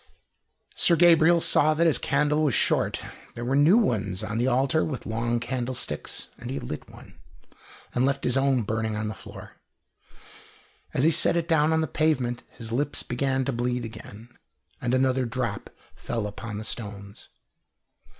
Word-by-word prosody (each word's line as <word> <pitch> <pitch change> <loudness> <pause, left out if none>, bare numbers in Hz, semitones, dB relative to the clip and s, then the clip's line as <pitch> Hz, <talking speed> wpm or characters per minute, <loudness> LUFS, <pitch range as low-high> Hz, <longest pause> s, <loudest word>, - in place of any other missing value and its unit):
Sir 170 - +4
Gabriel 170 0 +5
saw 155 -1 +3
that 165 +2 +2
his 155 -7 +4
candle 150 +2 +1
was 145 -6 +2
short. - - +1 0.3
There 120 - -5
were 130 +3 0
new 150 +9 +5
ones 100 - 0
on 110 +2 -3
the 120 - +1
altar, 135 +5 +2
with 135 -6 -4
long 115 +1 -1
candlesticks, 125 +1 -4
and 120 - -7
he 135 - -3
lit 75 - -7
one, - - -15 0.7
and 125 - +1
left 140 +1 0
his 125 - +1
own 135 -3 +2
burning 110 +1 -2
on 105 0 -2
the - - -4
floor. - - -12 1.3
As 130 - 0
he 160 - +5
set 165 +2 +4
it 170 -1 -1
down 160 -2 +3
on 160 0 +2
the 160 - -1
pavement 130 -5 0
his 115 -2 -9
lip 145 +5 -1
began 130 +1 0
to 140 - -1
bleed 120 0 -1
again, 110 0 -10 0.5
and 125 +1 0
another 130 -1 +1
drop 115 -4 -3 0.3
fell 115 -3 -4
upon 105 +1 -6
the 110 - -5
stones. 100 -3 -6
125 Hz, 170 wpm, -26 LUFS, 115-150 Hz, 1.3 s, Gabriel